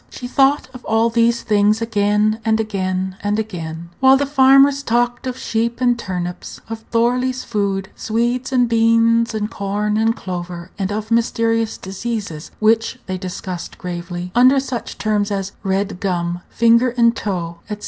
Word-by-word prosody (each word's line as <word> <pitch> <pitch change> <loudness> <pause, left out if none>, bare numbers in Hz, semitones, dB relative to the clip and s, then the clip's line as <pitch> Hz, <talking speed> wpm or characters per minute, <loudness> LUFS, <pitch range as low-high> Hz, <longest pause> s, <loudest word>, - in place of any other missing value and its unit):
She 245 - -7
thought 275 +3 +2
of 255 - -11
all 225 +1 +2
these 235 0 +2
things 210 0 +3
again, 210 -1 +1
and 220 0 +2
again, 190 -3 -2
and 205 +1 0
again, 170 -6 -5
while 265 0 +6
the 285 - 0
farmers 275 0 +5
talked 240 0 0
of 255 0 -4
sheep 230 0 -2
and 245 -1 +3
turnips, 180 -4 -5
of 225 0 -5
Thorley's 250 +2 +1
food, 200 -3 -2
Swedes, 240 +4 -1
and 250 -2 +3
beans, 230 0 +3
and 215 0 -2
corn, 210 +1 -1
and 225 +1 +2
clover, 175 -1 -6
and 195 0 -1
of 215 +2 -4
mysterious 230 -1 +1
diseases, 195 -5 -5
which 225 +3 +2
they 185 -1 -4
discussed 185 -1 -6
gravely, 175 0 -6
under 255 +3 +5
such 260 -3 -5
terms 210 -1 0
as 195 -1 -3
"red 195 -1 -1
gum," 175 -2 -2
"finger 235 +2 +4
and 235 -1 +4
toe," 170 -4 -3
etc. 210 -1 -4
220 Hz, 160 wpm, -19 LUFS, 190-235 Hz, -, while